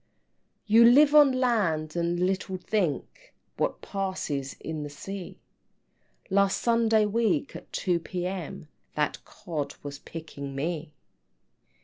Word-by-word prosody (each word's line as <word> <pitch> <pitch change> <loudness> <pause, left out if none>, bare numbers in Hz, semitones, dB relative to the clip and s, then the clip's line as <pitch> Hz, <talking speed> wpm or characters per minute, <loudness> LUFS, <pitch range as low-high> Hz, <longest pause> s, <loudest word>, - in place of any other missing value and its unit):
X. - - -46 0.6
"You 225 +2 +6
live 280 +5 +7
on 295 -2 +8
land, 205 -12 +1
and 170 0 0
little 190 +1 -1
think 180 - -3 0.2
What - - -1
passes 175 -9 -3
in 160 -1 -5
the 145 - -5
sea; 190 +5 -7 0.9
Last 200 0 +3
Sunday 225 -2 +3
week, 230 +7 0
at - - -10
2 175 -2 0
P.M., 180 -2 -5 0.3
That 150 -1 -1
Cod 155 -7 -5
was 140 -1 -7
picking 145 -4 -8
me!" 155 +1 -3
180 Hz, 120 wpm, -27 LUFS, 155-220 Hz, 0.9 s, on